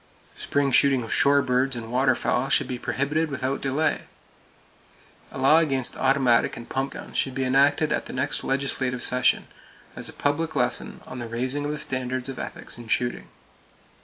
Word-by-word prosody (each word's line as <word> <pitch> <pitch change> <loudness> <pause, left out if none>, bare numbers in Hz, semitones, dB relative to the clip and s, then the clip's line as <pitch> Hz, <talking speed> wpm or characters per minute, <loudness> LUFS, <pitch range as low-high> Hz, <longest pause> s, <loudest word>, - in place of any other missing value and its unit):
Spring 140 -1 0
shooting 135 -1 +4
of 115 - -3
shore 140 0 +4
birds 130 +1 +1
and 115 -1 -6
waterfowl 130 0 +1
should - - +3
be 125 -1 -4
prohibited 150 +6 -1
without 135 -1 -2
delay. 140 +4 0 1.3
A - - -8
law 135 +4 +5
against 135 -6 0
automatic 130 -3 +2
and 120 - -9
pump 135 +1 -2
guns - - -10
should 135 -2 0
be 135 - -1
enacted 140 +4 +3
at - - -1
the - - -7
next 130 +3 -2
legislative 130 -2 -1
session, 125 0 +2 0.5
as - - -5
a - - -11
public 160 +3 -1
lesson - - -1
on 130 - -8
the 120 - -5
raising 130 +5 -2
of 145 - -1
the 150 - -3
standard 130 -2 -2
of 130 - -6
ethics - - -6
in 120 - -10
shooting. 120 +2 -1
135 Hz, 175 wpm, -25 LUFS, 125-140 Hz, 1.3 s, law